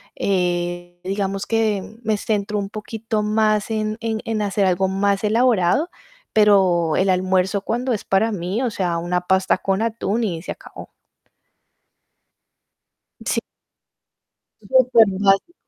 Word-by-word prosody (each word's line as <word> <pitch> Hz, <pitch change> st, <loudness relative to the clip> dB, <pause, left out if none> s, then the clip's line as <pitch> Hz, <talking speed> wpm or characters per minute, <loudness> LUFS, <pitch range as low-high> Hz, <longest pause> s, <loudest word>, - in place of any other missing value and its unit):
Eh, 175 Hz, -2 st, -2 dB
digamos 195 Hz, +1 st, -2 dB
que 220 Hz, -2 st, -1 dB
me 215 Hz, -1 st, 0 dB
centro 210 Hz, 0 st, -2 dB
un 195 Hz, -1 st, -3 dB
poquito 220 Hz, 0 st, -4 dB
más 215 Hz, 0 st, +1 dB
en 215 Hz, -1 st, -2 dB
en 225 Hz, -1 st, -2 dB
en 220 Hz, -2 st, -1 dB
hacer 200 Hz, -1 st, 0 dB
algo 190 Hz, +1 st, +2 dB
más 195 Hz, +1 st, 0 dB
elaborado, 230 Hz, -, +2 dB, 0.4 s
pero 190 Hz, -6 st, +4 dB
el 190 Hz, +1 st, +2 dB
almuerzo 185 Hz, +1 st, +1 dB
cuando 245 Hz, +4 st, -1 dB
es 210 Hz, -, -3 dB
para 205 Hz, +4 st, +1 dB
mí, 195 Hz, +4 st, -3 dB
o 245 Hz, -, 0 dB
sea, 175 Hz, -4 st, -1 dB
una 175 Hz, +1 st, -1 dB
pasta 190 Hz, +1 st, +1 dB
con 195 Hz, +1 st, -1 dB
atún 230 Hz, 0 st, -1 dB
y 170 Hz, -7 st, -2 dB
se -, -, -6 dB
acabó. -, -, -11 dB, 2.4 s
Sí. -, -, +1 dB, 1.3 s
Supermágico. 220 Hz, -, +3 dB
200 Hz, 125 wpm, -21 LUFS, 185-220 Hz, 2.4 s, pero